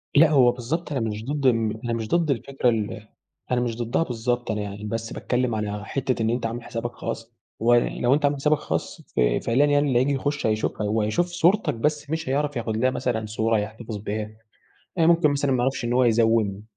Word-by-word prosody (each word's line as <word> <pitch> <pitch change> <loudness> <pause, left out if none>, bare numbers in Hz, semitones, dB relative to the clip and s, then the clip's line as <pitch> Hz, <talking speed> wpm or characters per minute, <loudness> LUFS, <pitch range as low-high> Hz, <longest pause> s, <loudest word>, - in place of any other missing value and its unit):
لأ، 155 +2 +7
هو 130 -5 +5
بالضبط 150 +7 -4
أنا 135 - 0
مش 105 +2 -5
ضد 145 0 -2
ال 115 -3 +2
أنا 120 - -1
مش 110 -2 -3
ضد 165 -1 +2
الفكرة 130 0 0
ال 110 -1 -3 0.4
أنا 125 -1 +2
مش 120 -2 -2
ضدها 120 +7 0
بالضبط، 120 -2 -2
أنا 105 -1 -2
يعني 100 0 -6
بس 115 +2 -4
باتكلم 125 -2 -1
على 105 -1 -3
حتّة 130 -2 -2
إن 110 - +1
أنتَ 120 0 -1
عامل 115 +1 -4
حسابك 120 +1 -4
خاص، 115 -1 -6 0.3
ولو 120 +2 +3
أنتَ 145 0 +2
عامل 145 0 +2
حسابك 150 +2 +2
خاص - - -4
ف - - -7 0.3
فعليًا 130 +5 +3
يعني 145 0 +3
اللي 125 -3 +3
هييجي 140 +2 +2
يخش 145 0 -2
هيشوفها، 110 -1 -1
وهيشوف 110 +10 +1
صورتك 180 +4 +2
بس 150 +4 -1
مش 160 -3 -2
هيعرف 145 +1 0
ياخد 110 -2 -2
لها 130 +3 +3
مثلًا 115 -4 -2
صورة 110 +1 0
يحتفظ 110 +1 -6
بيها. 105 +1 -4 0.7
آآ 165 - +4
ممكن 165 -3 +4
مثلًا 140 -1 0
ما 125 - +1
يعرفش 135 -1 -1
إن 120 - -1
هو 125 0 +4
يزَوِّم 110 -3 +2
120 Hz, 210 wpm, -24 LUFS, 110-140 Hz, 0.7 s, لأ